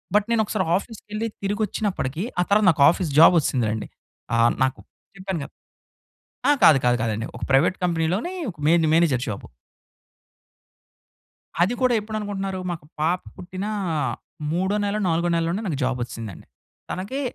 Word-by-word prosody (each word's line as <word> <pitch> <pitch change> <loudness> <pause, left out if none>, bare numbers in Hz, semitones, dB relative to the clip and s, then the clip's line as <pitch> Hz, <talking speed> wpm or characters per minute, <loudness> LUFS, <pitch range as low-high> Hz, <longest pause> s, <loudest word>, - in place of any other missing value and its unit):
But 210 - +4
నేనొకసారి 215 -4 +1
ఆఫీస్‌కెళ్లి, 215 +1 -5 0.2
తిరిగొచ్చినప్పడికీ 200 - -2
ఆ - - +4
తర్వాత 205 0 +4
నాకాఫీస్ 155 +3 +3
జాబొచ్చేసిందిలెండి. 125 - +4 0.5
ఆహ్, 115 0 +4
నాకు 130 0 -1 0.4
చెప్పాను 190 -3 -3
గదా! - - -11 1.0
ఆ! - - +7
కాదు 150 - +8
కాదు 120 0 +3
కాదండి. 110 -1 -1
ఒక - - -7
ప్రైవేట్ 150 +7 +4
కంపెనీలోనీ 175 - 0 0.2
ఒక 170 - -22
మెయిన్‌ని 165 -1 +4
మేనేజర్ 160 -7 +3
జాబు. 100 -2 -5 2.2
అది 195 +7 +1
కూడా 250 -1 +3
ఎప్పుడనుకుంటున్నారు, 205 -3 -4
మాకు 160 -4 -7 0.2
పాప 170 +4 +2 0.2
పుట్టిన 185 +2 -6 0.9
మూడో 190 +4 0
నెలో, 205 +1 -1
నాలుగో 170 +1 +1
నెలలోనే 170 +5 0
నాకు 145 -5 -2
జాబొచ్చిసిందండి. 120 -6 -4 0.5
తనకి 210 +10 -4
175 Hz, 125 wpm, -23 LUFS, 140-205 Hz, 2.2 s, కాదు